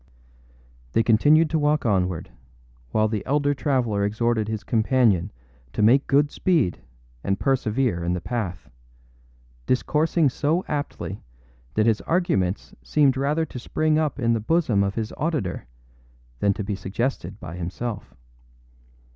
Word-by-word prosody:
They 115 - +3
continued 145 +9 +5
to 160 - +1
walk 150 -2 +1
onward, 90 -5 0 0.6
while 110 - +2
the 110 -2 -3
elder 145 +1 +1
traveller 125 -8 0
exhorted 110 +1 0
his 110 -1 -4
companion 110 -5 +2 0.4
to 105 - 0
make 130 +6 +4
good 145 +1 +3
speed 150 - +1 0.4
and 95 0 -1
persevere 125 -7 0
in 85 +1 0
the 90 - -1
path, 95 -5 -4 1.0
discoursing 155 +5 +2
so 155 +8 0
aptly 145 -1 -4 0.5
that 110 - +3
his 115 -2 +2
arguments 100 - 0
seemed 140 -3 +2
rather 145 +4 0
to 130 - -8
spring 155 +4 +1
up 155 -4 -1
in 115 -2 +2
the 115 - 0
bosom 115 -5 +2
of 100 0 -2
his 110 -1 -3
auditor 145 - -2 0.7
than 100 -1 +2
to 105 - -4
be 100 +1 -3
suggested 100 0 -3
by 85 - -8
himself. 95 +6 -5
120 Hz, 140 wpm, -24 LUFS, 100-145 Hz, 1.0 s, continued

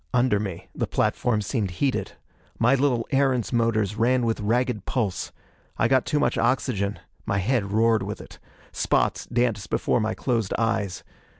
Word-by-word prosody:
Under 120 -4 +3
me 95 -5 -5
the - - -2
platform 110 -4 0
seemed 105 -2 -1
heated. 135 +3 -1 0.4
My 125 +4 +4
little 130 -4 +2
Erentz 135 -3 +2
motors 110 -3 +1
ran 120 +2 +2
with 115 -1 0
ragged 115 0 0
pulse. 105 -7 -1 0.5
I - - +3
got 130 -2 +2
too 150 - +1
much - - +1
oxygen; 105 -6 0 0.3
my 100 - +1
head 100 0 0
roared 110 0 +3
with 100 +2 -5
it. - - -12 0.3
Spots - - 0
danced 115 -4 0
before - - +1
my 110 0 -1
closed 115 -6 -1
eyes. 110 -5 -1
115 Hz, 160 wpm, -25 LUFS, 105-125 Hz, 0.5 s, My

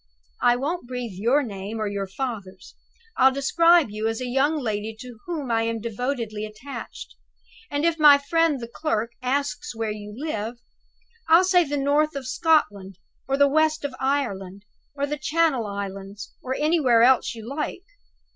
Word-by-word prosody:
I 245 0 +5
won't 285 +3 -3
breathe 250 -4 -5
your 235 +10 +2
name 205 -1 -6
or 215 - -2
your 200 -1 -3
father's. 195 -3 -6 0.4
I'll 265 +1 +6
describe 330 +1 +4
you 215 +1 -2
as 225 0 -2
'a 255 - -3
young 270 +5 +1
lady 220 -4 -3
to 245 -3 -10
whom 300 -8 -3
I 225 0 +2
am 230 0 -1
devotedly 230 -1 -3
attached.' 215 +6 -8 0.6
And 290 +2 -1
if 335 -1 +1
my 295 -2 +8
friend 310 +1 +1
the 235 - -6
clerk 235 -3 -2
asks 255 -3 -2
where 225 -1 -2
you 210 0 -7
live, 235 -6 -3 0.7
I'll 335 +3 +7
say 360 -2 +4
the 290 0 -2
north 290 +2 +1
of 275 -2 -5
Scotland, 205 - +1 0.3
or 270 0 0
the 285 0 +5
west 310 +1 +1
of 280 - -3
Ireland, 200 -8 -2 0.3
or 285 0 -1
the 295 0 -4
Channel 300 -6 +1
Islands, 200 0 -7
or 260 +1 -3
anywhere 290 -7 +3
else 255 -1 +4
you 225 -1 -9
like. 300 +6 -4
255 Hz, 165 wpm, -24 LUFS, 215-290 Hz, 0.7 s, my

